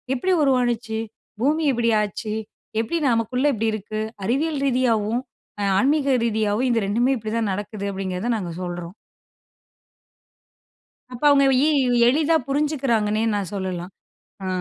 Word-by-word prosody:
எப்படி 370 +9 0
உருவானுச்சு? 245 -4 +1 0.4
பூமி 305 +4 +2
இப்படி 230 -1 +1
ஆச்சு! 210 +1 -4 0.5
எப்படி 230 +10 -1
நமக்குள்ளே 250 +5 +1
இப்படி 225 0 0
இருக்கு? 215 +1 -4 0.2
அறிவியல் 290 +5 0
ரீதியாவும், 240 -3 +1 0.4
அ - - 0
ஆன்மீக 275 +1 +2
ரீதியாவும் 220 +2 0
இந்த 230 -2 +2
2மே 240 +6 +2
இப்படிதான் 220 -1 -2
நடக்குது, 205 0 -5
அப்படிங்கிறத 190 +4 -3
நாங்க 175 -5 -5
சொல்றோம். 175 +1 -6 2.2
அப்போ 250 +4 -4
அவுங்க 275 -1 +5 0.2
எ - - +4 0.4
எளிதா 310 +5 +3
புரிஞ்சுக்குறாங்கன்னே 260 -7 0
நான் 200 -3 -3
சொல்லலாம். 185 -2 -4 0.5
அ. - - -3
230 Hz, 120 wpm, -23 LUFS, 210-265 Hz, 2.2 s, அவுங்க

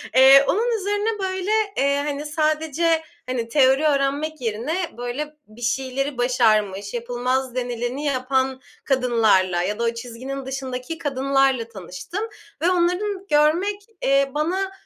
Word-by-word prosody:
Eee, 270 +1 +8
onun 460 +3 +1
üzerine 415 +2 -1
böyle, 375 +1 -2 0.3
eee, 280 +1 +2
hani, 290 +1 -3
sadece, 315 +1 +1 0.2
hani, 250 -2 -2
teori 270 +2 +4
öğrenmek 285 +2 0
yerine, 250 - -2
böyle, 265 +5 -4
bir 215 +3 -16
şeyleri 265 +3 -1
başarmış, 215 -5 +1
yapılmaz 250 +2 -2
denileni 245 +3 -3
yapan 265 -1 0 0.2
kadınlarla 220 -9 +2
ya 210 +4 -2
da - - 0
o 230 0 +1
çizginin 255 +3 -6
dışındaki 265 +3 -5
kadınlarla 270 -4 +1
tanıştım 195 - -7 0.4
ve 355 +2 +3
onların 370 +3 0
görmek, 340 +8 +2 0.2
eee, 275 0 +3
bana 370 +6 -1
270 Hz, 125 wpm, -22 LUFS, 245-315 Hz, 0.4 s, Eee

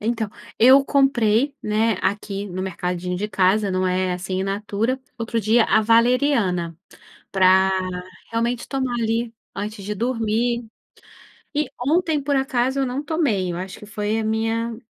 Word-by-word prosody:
Então 225 -1 -1 0.3
eu 265 +4 +7
comprei, 270 -1 +2
né, 220 +2 +1
aqui 200 0 -2
no 185 -1 -5
mercadinho 180 -1 -3
de 210 +3 -3
casa, 195 +1 +2
não 185 0 0
é 185 0 0
assim 185 +1 -5
in - - -1
natura, 210 +5 -1 0.2
outro 230 0 -1
dia 225 +3 +4
a 220 - +3
valeriana, 230 - +2 0.6
para 190 0 +5 0.6
realmente 235 +1 -1
tomar 260 -3 -2
ali 230 +1 -1 0.2
antes 205 0 -5
de 210 - -3
dormir. 235 +1 -1 0.9
E 300 +1 0
ontem 310 +2 +1
por 285 0 0
acaso 265 0 0
eu 270 - +1
não 255 +3 -3
tomei, 245 - 0
eu 170 - -4
acho 190 +1 -6
que 210 - -11
foi 210 0 -2
a - - -3
minha 225 +1 -1
220 Hz, 155 wpm, -22 LUFS, 195-245 Hz, 0.9 s, eu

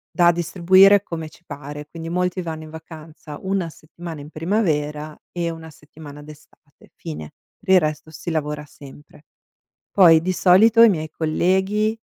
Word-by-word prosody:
da 175 -1 +5
distribuire 185 +4 +4
come 160 -3 -6
ci 165 - -21
pare. 145 +1 -8
Quindi 165 0 -8
molti 180 +1 -1
vanno 160 -2 -6
in 155 - -11
vacanza 160 -2 -11
una 190 -3 -2
settimana 160 +1 -10
in 145 - -11
primavera 155 -4 -2
e 170 -1 -2
una 160 0 -10
settimana 150 -1 -13
d'estate 150 0 -18
fine. 75 -1 -8 0.3
Per 190 - +1
il - - +7
resto 155 -1 -3
si 165 +2 -7
lavora 150 -1 -3
sempre. 145 +1 -16 0.7
Poi 165 -5 +6
di 185 +3 -1
solito 210 +6 +5
i 230 - +9
miei 155 -5 -2
colleghi, 190 +8 0
160 Hz, 155 wpm, -21 LUFS, 150-180 Hz, 0.7 s, i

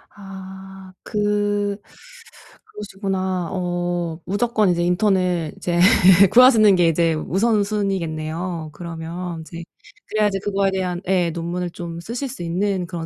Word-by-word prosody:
아 190 -1 -11
그 205 -1 -1 0.9
그러시구나. 190 -3 -4
어 175 -2 -2
무조건 210 +2 +1
이제 175 -1 +1
인턴을 180 -3 +1
이제 175 -1 -1 0.5
구하시는 230 -5 +7
게 175 -2 +3
이제 165 0 +2
우선순위겠네요 180 -4 -1
그러면 170 +1 -6
이제. 170 +1 -9 0.5
그래야지 210 -2 +1
그거에 195 -1 0
대한 180 -2 -2
예 180 -3 +1
논문을 175 +2 -4
좀 170 -1 -7
쓰실 240 +9 -5
수 240 -8 -7
있는 185 +2 -1
그런 170 -2 -5
185 Hz, 265 characters per minute, -21 LUFS, 170-200 Hz, 0.9 s, 구하시는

